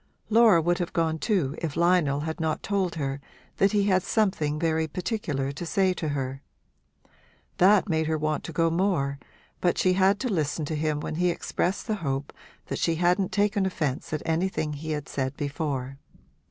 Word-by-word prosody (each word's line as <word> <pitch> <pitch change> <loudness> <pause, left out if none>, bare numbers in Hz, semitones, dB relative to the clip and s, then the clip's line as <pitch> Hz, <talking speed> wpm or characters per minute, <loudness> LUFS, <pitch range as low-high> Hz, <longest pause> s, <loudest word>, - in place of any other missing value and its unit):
Laura 220 -5 +6
would 175 +1 +1
have 175 0 -3
gone 160 -2 0
too 165 - 0
if 160 -4 -3
Lionel 170 -5 +3
had 160 +3 -4
not 160 -1 -1
told 195 -4 0
her 140 -2 -3 0.4
that 195 0 +4
he 205 -1 +2
had 190 -2 +3
something 185 -8 0
very 160 0 0
particular 155 - -2
to 140 - -7
say 185 +2 +2
to 165 -3 -4
her. 135 -2 -3 1.2
That 195 +3 +5
made 160 -3 0
her 160 0 0
want 155 0 -1
to - - -5
go 165 +1 +1
more, 165 -6 0 0.4
but 175 - +1
she 185 - +3
had 195 +2 +3
to 260 - 0
listen 155 -2 -1
to 155 - -3
him 150 -1 -1
when 155 - -4
he 180 +1 +2
expressed 180 +2 -2
the 215 -1 -1
hope 135 -2 -3 0.3
that - - -4
she 165 - +1
hadn't 180 +3 +2
taken 205 0 +1
offence 155 -8 -2
at 155 - -2
anything 160 -2 0
he 155 +2 -6
had 150 -2 -3
said 135 0 -3
before. 140 -3 -3
165 Hz, 185 wpm, -26 LUFS, 150-185 Hz, 1.2 s, Laura